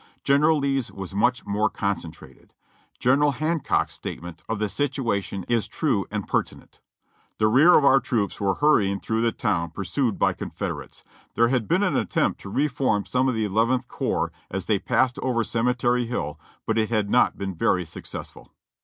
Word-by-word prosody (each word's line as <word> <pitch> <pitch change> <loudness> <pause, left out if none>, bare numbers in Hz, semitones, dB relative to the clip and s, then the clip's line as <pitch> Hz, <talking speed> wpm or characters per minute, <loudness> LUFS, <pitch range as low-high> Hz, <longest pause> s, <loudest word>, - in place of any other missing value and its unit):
General 150 +3 +4
Lee's 135 -3 -1
was 95 -1 -8
much 120 +5 +1
more 105 +2 +1
concentrated. 85 -10 -5 0.4
General 140 +3 +3
Hancock's 155 +3 0
statement 85 0 -7
of 110 - -1
the 105 +1 0
situation 115 -7 -2
is 115 -3 +1
true 110 - -1
and 105 -2 -4
pertinent: - - -3 0.6
'The 110 - +3
rear 140 +11 +6
of 145 - +3
our 135 0 +6
troops 110 -7 -2
were 100 -1 +1
hurrying 100 -10 +3
through 110 +2 -1
the 115 0 +2
town, 90 -9 -1
pursued 100 - -2
by - - +2
Confederates. - - -6 0.3
There 115 0 +4
had 125 -4 0
been 185 +4 +2
an 185 - +1
attempt - - 0
to 100 - -8
reform 130 -4 0
some 130 +1 +1
of 125 - -1
the 110 -1 0
Eleventh 115 +5 +1
Corps - - -2 0.2
as - - -4
they - - +1
passed 130 -1 +1
over 120 -3 0
Cemetery 120 +1 0
Hill, 80 -10 -4 0.3
but - - +1
it 110 - 0
had 105 -3 0
not - - +3
been 95 -1 -4
very 90 +1 +1
successful.' 80 - -9
115 Hz, 170 wpm, -24 LUFS, 100-130 Hz, 0.6 s, rear